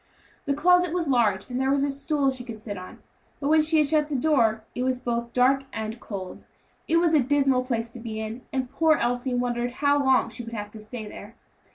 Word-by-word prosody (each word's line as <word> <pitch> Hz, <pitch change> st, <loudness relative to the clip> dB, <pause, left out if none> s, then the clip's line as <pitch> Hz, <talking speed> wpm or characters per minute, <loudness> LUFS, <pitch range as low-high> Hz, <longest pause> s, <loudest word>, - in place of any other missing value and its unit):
The 280 Hz, -, 0 dB
closet 360 Hz, +2 st, +3 dB
was 340 Hz, -3 st, -1 dB
large, 220 Hz, -8 st, +2 dB
and 250 Hz, 0 st, -3 dB
there 265 Hz, -, +1 dB
was 275 Hz, 0 st, +2 dB
a 285 Hz, -, 0 dB
stool 280 Hz, 0 st, 0 dB
she 255 Hz, -1 st, -7 dB
could 230 Hz, -3 st, -8 dB
sit 210 Hz, -1 st, -6 dB
on; 185 Hz, -1 st, -10 dB, 0.4 s
but 280 Hz, -, -1 dB
when 315 Hz, 0 st, +5 dB
she 315 Hz, +1 st, +2 dB
had 300 Hz, -2 st, +4 dB
shut 300 Hz, 0 st, +2 dB
the 295 Hz, -, -2 dB
door, 235 Hz, -6 st, +2 dB
it 245 Hz, -, -4 dB
was 255 Hz, 0 st, 0 dB
both 235 Hz, -1 st, -3 dB
dark 265 Hz, +2 st, +3 dB
and 220 Hz, +1 st, -5 dB
cold. 190 Hz, -5 st, -7 dB, 0.4 s
It 330 Hz, -, +3 dB
was 335 Hz, -1 st, +3 dB
a 310 Hz, -, +6 dB
dismal 270 Hz, -1 st, +2 dB
place 235 Hz, -2 st, -2 dB
to 240 Hz, -, -10 dB
be 225 Hz, -2 st, -5 dB
in, 220 Hz, +3 st, -5 dB
and 260 Hz, -1 st, -1 dB
poor 320 Hz, -1 st, +3 dB
Elsie 245 Hz, +1 st, -1 dB
wondered 245 Hz, 0 st, -1 dB
how 285 Hz, +1 st, +2 dB
long 265 Hz, -1 st, +3 dB
she 240 Hz, -, -7 dB
would 230 Hz, 0 st, -7 dB
have 210 Hz, -1 st, -5 dB
to 220 Hz, -, -10 dB
stay 215 Hz, +1 st, -7 dB
there. 210 Hz, +2 st, -11 dB
255 Hz, 235 wpm, -25 LUFS, 230-285 Hz, 0.4 s, a